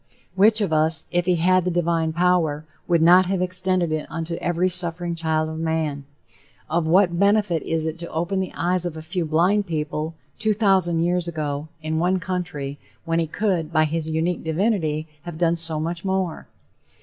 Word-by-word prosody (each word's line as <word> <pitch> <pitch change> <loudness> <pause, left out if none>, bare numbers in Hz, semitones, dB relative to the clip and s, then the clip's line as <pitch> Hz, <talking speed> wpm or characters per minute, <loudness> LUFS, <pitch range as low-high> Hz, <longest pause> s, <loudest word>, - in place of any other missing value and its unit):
Which 215 +4 +4
of 190 -6 0
us, 155 0 +3
if 175 0 0
he 180 - +3
had 185 +2 +3
the 180 - -1
divine 170 -2 0
power, 165 -3 +1 0.2
would 170 -2 +3
not 180 +2 +6
have 190 0 -1
extended 185 -1 0
it 155 -1 -2
unto 165 +1 -4
every 175 +1 0
suffering 175 -1 +1
child 160 -1 -1
of 160 0 -6
man? 160 -3 -2 0.7
Of 165 0 +1
what 175 0 +3
benefit 200 -4 +2
is 160 -1 -2
it 160 +1 -4
to 170 - -7
open 175 +4 -2
the 190 - -3
eyes 180 +1 +1
of 170 -3 -3
a 160 - -8
few 175 +1 -3
blind 180 +6 +2
people, 155 0 -3 0.2
two 215 -1 +2
thousand 190 -5 +2
years 175 0 0
ago, 150 -2 -3 0.2
in 160 0 -1
one 180 +3 +2
country, 165 -7 -4 0.3
when 165 0 0
he 165 - 0
could, 175 -3 -1
by 155 -2 +3
his 160 +1 -3
unique 160 +2 -1
divinity, 160 -3 -1
have 170 +1 -8
done 170 0 +2
so 165 -2 +2
much 170 +2 -3
more? 190 -3 -2
170 Hz, 185 wpm, -23 LUFS, 160-180 Hz, 0.7 s, not